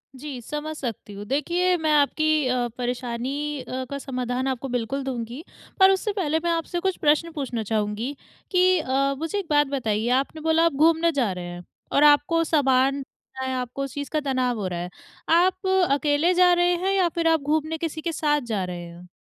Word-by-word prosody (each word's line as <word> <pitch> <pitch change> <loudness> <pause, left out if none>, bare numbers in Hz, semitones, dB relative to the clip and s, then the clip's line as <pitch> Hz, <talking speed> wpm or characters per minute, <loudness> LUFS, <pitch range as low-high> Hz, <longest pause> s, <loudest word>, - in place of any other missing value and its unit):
जी, 265 -1 -7
समझ 300 +5 -5
सकती 230 -6 -6
हूँ। 200 +1 -8
देखिए, 345 - +1
मैं 315 -2 0
आपकी 305 0 +2
अ, 250 -1 0
परेशानी 250 +4 -3
अ, 260 +1 -5
का 280 - -4
समाधान 255 -1 -3
आपको 265 0 -2
बिल्कुल 245 +3 -2
दूँगी, 250 +1 -5 0.4
पर 380 0 +7
उससे 385 +2 0
पहले 320 -6 0
मैं 340 - +1
आपसे 335 +1 -2
कुछ 380 +1 -1
प्रश्न 305 +3 +2
पूछना 260 -7 -3
चाहूँगी 215 +5 -2 0.4
कि 365 -1 +4
अ, 275 -1 0
मुझे 325 +7 -3
एक 395 - -5
बात 295 -1 +3
बताइए, 230 -5 -1
आपने 275 +5 0
बोला 320 +1 +3
आप 335 - +2
घूमने 325 +3 +3
जा 260 -9 0
रहे 180 -1 -6
हैं 175 0 -8 0.3
और 285 - +3
आपको 295 +3 +5
सामान 275 -3 +2
चाहे, 260 0 -8
आपको 255 +2 -3
उस 275 - -6
चीज़ 285 -1 -5
का 310 - 0
तनाव 255 -4 -1
हो 195 - -2
रहा 175 -1 -4
है। 175 +1 -5 0.4
आप 370 +3 +3 0.2
अकेले 290 +4 +2
जा 360 0 +5
रहे 350 0 +3
हैं 375 +3 0
या 375 -3 +3
फिर 335 -1 +1
आप 325 -2 +3
घूमने 310 +2 -1
किसी 320 -1 -4
के 335 - -2
साथ 295 -2 +1
जा 195 -3 0
रहे 175 -1 -7
हो? 175 +1 -13
285 Hz, 200 wpm, -24 LUFS, 250-325 Hz, 0.4 s, पर